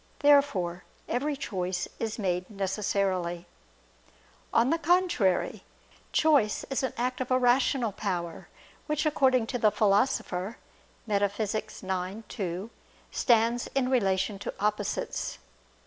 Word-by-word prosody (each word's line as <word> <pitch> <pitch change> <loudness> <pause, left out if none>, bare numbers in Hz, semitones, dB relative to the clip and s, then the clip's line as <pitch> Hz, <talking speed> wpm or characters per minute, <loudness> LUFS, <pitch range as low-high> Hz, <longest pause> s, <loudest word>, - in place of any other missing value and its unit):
Therefore 215 - +3 0.2
every 285 +5 -1
choice 185 -7 -2
is 225 -1 -2
made 180 -4 -1
necessarily. 190 -3 -1 1.1
On 235 +3 +3
the 330 - +1
contrary, 335 - +2 0.5
Choice 285 -10 +3
is 270 - 0
an 260 -3 -2
act 255 +2 -1
of 255 - -3
a 255 - +4
rational 250 -1 +3
power; 180 -5 -4 0.4
which 300 0 0
according 260 -5 +3
to 245 +2 -3
the 215 - +5
Philosopher 205 -1 +1 0.5
(Metaph. 205 0 0
ix, 215 -1 -5 0.5
2) 185 +2 -4 0.4
stands 235 0 +2
in 260 -2 +2
relation 195 -4 +1
to - - -4
opposites. 210 +1 -2
215 Hz, 115 wpm, -28 LUFS, 190-255 Hz, 1.1 s, the